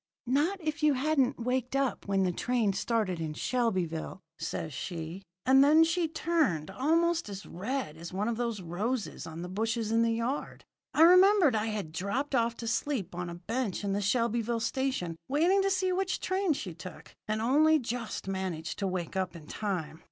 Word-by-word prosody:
"'Not 295 +10 +1
if 315 -2 -3
you 300 -2 +4
hadn't 275 -1 +1
waked 250 +2 -1
up 275 -5 0
when 195 -1 +2
the 180 - +1
train 230 +1 0
started 195 -3 0
in 155 -2 -3
Shelbyville,' 185 -8 -1 0.2
says 155 -2 -4
she; 170 +4 -5 0.2
and 265 +1 +7
then 310 +3 +7
she 335 +1 +1
turned 305 - 0
almost 330 - +1
as 200 0 -7
red 205 - -4
as 170 +1 -8
one 200 +3 -1
of 235 - 0
the 235 0 -1
roses 200 +4 -3
on 165 +1 -7
the - - -5
bushes 225 +3 -1
in 230 0 +3
the 230 - +3
yard. 235 +5 -3 0.3
I 315 - +7
remembered 365 - +7
I 215 +1 0
had 210 -7 -3
dropped 200 - -2
off 230 -2 +1
to 230 - -5
sleep 225 - -1
on 175 0 -4
a 170 - -6
bench 210 +3 -3
in 200 -1 0
the 200 - 0
Shelbyville 230 +2 +1
station, 225 -8 -1
waiting 340 +8 +3
to 390 - +2
see 375 -1 +1
which 375 0 0
train 375 -2 +1
she 185 - -5
took, 175 +3 -11
and 215 0 -1
only 300 +7 +4
just 240 -6 -4
managed 185 -4 -3
to 195 - 0
wake 180 -2 -3
up 185 -2 -1
in 160 -3 -10
time. 165 -5 -4
230 Hz, 190 wpm, -30 LUFS, 185-285 Hz, 0.3 s, and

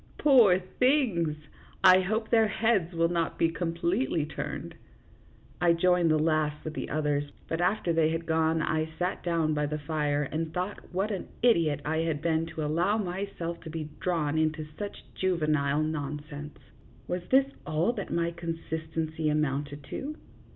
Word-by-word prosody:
Poor 240 -11 +6
things! 185 - +1 0.5
I 185 -1 +8
hope 220 +4 -1
their 225 -1 +5
heads 210 -5 +1
will 165 0 +3
not 170 -2 -1
be 165 - +3
completely 170 - -1
turned." 150 - -5 0.9
I 175 -1 +5
joined 175 0 +3
the 155 - +4
laugh 155 -1 +1
with 155 - -5
the - - -4
others, 145 -1 0 0.2
but 165 +1 -2
after 175 -2 +1
they 160 -1 +3
had 165 +1 -2
gone 160 0 +2
I 155 +1 0
sat 180 +1 -1
down 165 -3 +1
by 150 -1 0
the 150 +1 -2
fire 150 -1 0
and 155 +3 -3
thought 180 +4 -4
what 195 +4 -1
an 195 - -4 0.2
idiot 165 - +3
I 160 +1 0
had 160 -2 0
been 165 +1 0
to 160 -2 -4
allow 170 +8 +1
myself 180 -3 -4
to 165 - -8
be 155 -1 -5
drawn 160 -4 0
into 155 0 0
such 205 -1 -6
juvenile 155 -5 +1
nonsense. 150 -1 -5 0.5
Was 180 0 -2
this 270 +1 +4 0.2
all 160 +9 +1
that 200 -4 -5
my 170 0 0
consistency 160 -2 -3
amounted 145 -1 -1
to 300 +3 -4
165 Hz, 160 wpm, -28 LUFS, 155-180 Hz, 0.9 s, I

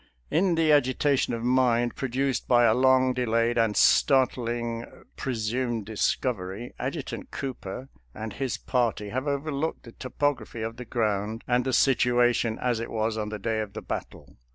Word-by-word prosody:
In 175 +2 +2
the 160 -1 +3
agitation 140 -2 +2
of 115 - -6
mind 120 -1 +2
produced 130 -1 -1
by 120 -1 +5
a 110 -2 +5
long 130 +1 +4
delayed 115 -1 +1
and 110 -2 +1
startling 120 -3 +2 0.3
presumed 120 -2 -2
discovery, 110 0 -2
Ad 130 +2 -2
jutant 145 -5 -6
Cooper 130 -2 -6 0.3
and 110 -1 -6
his 135 -3 -2
party 115 -5 -1
have 130 +6 -3
overlooked 145 +2 -2
the 115 - -11
topography 130 -2 -2
of 115 +1 -5
the 125 - -7
ground 110 -1 -1
and 125 0 +2
the 130 - 0
situation 120 -2 +3
as 120 -2 0
it 115 - -4
was 110 0 -1
on 105 -1 -3
the 105 - -4
day 110 +2 -2
of 105 -2 -4
the - - -7
battle. - - -7
120 Hz, 160 wpm, -26 LUFS, 115-130 Hz, 0.3 s, by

